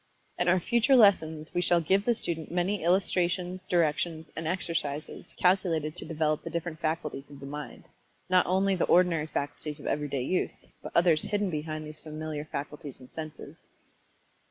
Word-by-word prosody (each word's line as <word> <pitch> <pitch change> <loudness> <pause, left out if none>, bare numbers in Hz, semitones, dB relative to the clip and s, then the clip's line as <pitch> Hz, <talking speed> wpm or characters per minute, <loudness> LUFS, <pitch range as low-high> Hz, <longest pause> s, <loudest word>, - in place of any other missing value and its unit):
In 175 - +1
our 180 +1 +5
future 235 +7 +3
lessons 160 -9 +4
we 175 - +1
shall 175 -1 +4
give 190 +5 +2
the 240 - +3
student 165 -6 -2
many 180 +2 0
illustrations, 180 0 +1
directions, 165 -2 0
and 165 -1 -3
exercises 160 -4 -3
calculated 175 -4 +2
to - - -5
develop 155 -1 0
the - - -5
different 170 -1 -4
faculties 155 -4 -3
of 140 -1 -12
the 140 - -8
mind 145 +1 -7 0.4
not 185 0 +4
only 190 +2 +2
the 180 - +1
ordinary 170 -3 +3
faculties 150 0 -4
of - - -11
everyday 145 -3 -1
use, 180 +8 -2 0.2
but - - -7
others 170 -3 +5
hidden 205 -2 -1
behind 155 0 -4
these 155 0 -7
familiar 155 -1 -5
faculties 145 -2 -6
and 130 -1 -15
senses. 155 -1 -8
165 Hz, 165 wpm, -29 LUFS, 155-180 Hz, 0.4 s, our